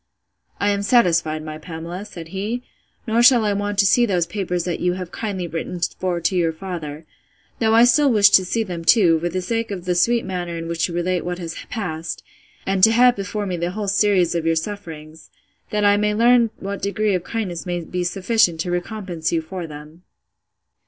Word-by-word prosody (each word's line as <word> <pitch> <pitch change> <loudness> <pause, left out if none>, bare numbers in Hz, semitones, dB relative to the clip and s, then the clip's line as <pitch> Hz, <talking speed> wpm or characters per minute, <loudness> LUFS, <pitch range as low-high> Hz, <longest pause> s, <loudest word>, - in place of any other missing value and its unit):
I 205 0 +2
am 200 0 -1
satisfied, 170 -8 +2
my 155 0 -7
Pamela, 170 +4 -7
said 170 -6 -10
he; 210 +7 -4 0.4
nor 230 0 +2
shall 240 -2 +6
I 205 - +1
want 205 0 -2
to 200 - +4
see 240 +5 +4
those 180 -4 +1
papers 180 -1 -3
that 175 -1 -3
you 180 0 +1
have 180 -1 -6
kindly 195 -5 -4
written 170 +2 -5 0.2
for 180 -2 -1
to 170 +3 0
your 170 -2 +2
father; 160 -3 -7 0.5
though 225 -1 +3
I 230 - +7
still 270 +3 +4
wish 205 -3 +6
to 190 - +6
see 225 +5 -1
them 175 -5 -6
too, 170 -4 +5
for 175 +2 -2
the 185 +1 -3
sake 230 +3 -2
of 190 -3 -6
the 180 - +1
sweet 235 +7 +2
manner 175 -2 -4
in 165 0 -5
which 165 -1 -1
you 170 - -6
relate 180 +1 -1
what 180 0 -3
has 170 -2 -6 0.2
passed, 170 -7 -5 0.4
and 190 -1 0
to 225 - +8
have 245 +2 +5
before 205 +1 -4
me 185 -2 -3
the 170 +1 -2
whole 210 0 -4
series 195 -3 +2
of 170 -1 -1
your 165 0 +1
sufferings, 160 -4 -7 0.4
that 210 -1 0
I 205 0 +5
may 210 0 +1
learn 235 +1 +4
what 200 0 -5
degree 205 +1 0
of 180 -2 -1
kindness 190 -5 -4
may 175 -1 -2
be 180 +2 -4
sufficient 185 -1 +1
to 175 - -3
recompense 175 -3 -3
you 165 -1 0
for 175 +1 -6
them. 150 +2 -11
185 Hz, 210 wpm, -21 LUFS, 170-210 Hz, 0.5 s, to